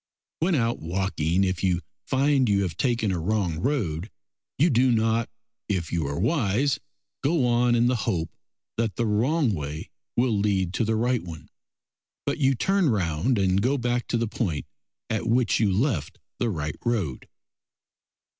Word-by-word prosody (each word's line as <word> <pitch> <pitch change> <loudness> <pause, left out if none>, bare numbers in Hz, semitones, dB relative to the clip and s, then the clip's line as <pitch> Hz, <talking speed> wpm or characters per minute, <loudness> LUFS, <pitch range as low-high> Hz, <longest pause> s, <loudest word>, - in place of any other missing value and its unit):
When 170 +2 +2
out 115 -3 0
walking, 90 0 0
if 90 -1 -1
you 90 -2 +2 0.3
find 135 -2 +2
you 100 -1 +3
have 85 -4 -3
taken 115 -3 +1
a 90 - -1
wrong 90 -2 0
road 100 - -1 0.5
you 165 +4 +4
do 125 +2 +4
not, 115 0 +1 0.4
if 90 -6 -1
you 80 -4 0
are 70 - -3
wise, 130 - +1 0.4
go 145 -2 +2
on 120 0 +3
in 120 0 +3
the 125 0 +2
hope 85 -8 -1 0.5
that 115 -3 0
the 120 - 0
wrong 120 +5 +2
way 75 -2 -5 0.3
will 120 -2 +3
lead 100 -3 +1
to 115 - 0
the 110 +1 +1
right 120 +2 +1
one, 85 -3 -10 0.8
but - - -1
you 135 -1 +3
turn 195 +4 +2
round 100 +3 +1
and 95 0 +2
go 130 +6 +2
back 120 -1 -1
to 120 - 0
the 115 0 0
point 95 -8 -2 0.4
at 110 +1 -2
which 120 +1 +2
you 105 -3 +3
left 95 - 0 0.2
the 120 - +1
right 75 -7 -3
road. 100 - -1
110 Hz, 165 wpm, -25 LUFS, 90-125 Hz, 0.8 s, you